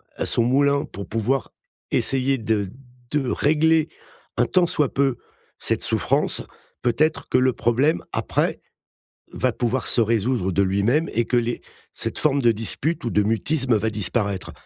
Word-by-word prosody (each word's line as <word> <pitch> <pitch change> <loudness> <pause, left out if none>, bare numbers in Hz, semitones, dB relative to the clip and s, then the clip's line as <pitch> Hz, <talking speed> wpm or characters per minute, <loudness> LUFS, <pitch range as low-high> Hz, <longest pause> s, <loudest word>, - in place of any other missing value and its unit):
à - - -2
son 115 - +2
moulin 140 +3 +2
pour 100 +1 -9
pouvoir 115 +5 -1 0.4
essayer 135 0 +1
de 110 -3 -1 0.4
de 140 -4 0
régler 160 +2 +2 0.5
un - - +3
tant 180 -2 +2
soit 150 -5 0
peu 135 -3 +1 0.4
cette - - 0
souffrance, - - +1 0.4
peut-être 155 +7 0
que - - +3
le 130 0 +3
problème 130 +9 +1
après - - -1 0.7
va 130 - 0
pouvoir 120 +3 -1
se 120 - +3
résoudre 115 -2 0
de 100 +3 +1
lui-même 100 - +1
et 115 - +2
que 125 - +1
les 120 0 -1 0.3
cette - - -2
forme 140 -2 +2
de 120 -2 +4
dispute 115 +9 -2
ou - - 0
de 105 -2 +2
mutisme 125 +4 +1
va 110 +2 -1
disparaître». 100 -2 -2
125 Hz, 155 wpm, -23 LUFS, 110-140 Hz, 0.7 s, de